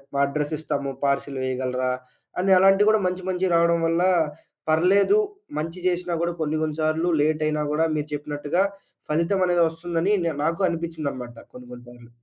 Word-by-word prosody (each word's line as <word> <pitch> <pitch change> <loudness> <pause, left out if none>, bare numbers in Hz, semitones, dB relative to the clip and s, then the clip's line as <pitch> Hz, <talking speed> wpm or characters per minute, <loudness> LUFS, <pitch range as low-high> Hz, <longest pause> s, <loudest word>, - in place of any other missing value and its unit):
మా - - +1
అడ్రెస్ 145 +2 -2
ఇస్తాము, 140 -3 -3
పార్సిల్ 140 0 -1
వేయగలరా? 130 0 -1 0.5
అని 190 +1 +2
అలాంటివి 195 +2 +5
గూడా 220 -1 +3
మంచి 180 0 -3
మంచివి 185 0 0
రావడం 170 0 +3
వల్ల, 165 +1 +1 0.7
పర్లేదు 195 - +4 0.4
మంచి 165 +3 -5
చేసినా 180 -1 -1
కూడా 170 0 -1
కొన్ని 155 0 0
కొన్ని 155 -1 -3
సార్లు 155 +2 +1
లేట్ 155 +1 +1
అయినా 150 0 -1
గూడా 155 +2 +2
మీరు 150 -1 -2
చెప్పినట్టుగా 150 +4 -1 0.5
ఫలితం 170 +5 +1
అనేది 175 -1 +2
వస్తుందని. 165 +3 -2
నే 165 - +1
నాకు 165 +4 -1
అనిపిచ్చిందనమాట. 155 -8 -5 0.2
కొన్ని 125 0 -12
కొన్ని 120 0 -11
సార్లు. 120 -1 -15
160 Hz, 160 wpm, -24 LUFS, 145-175 Hz, 0.7 s, అలాంటివి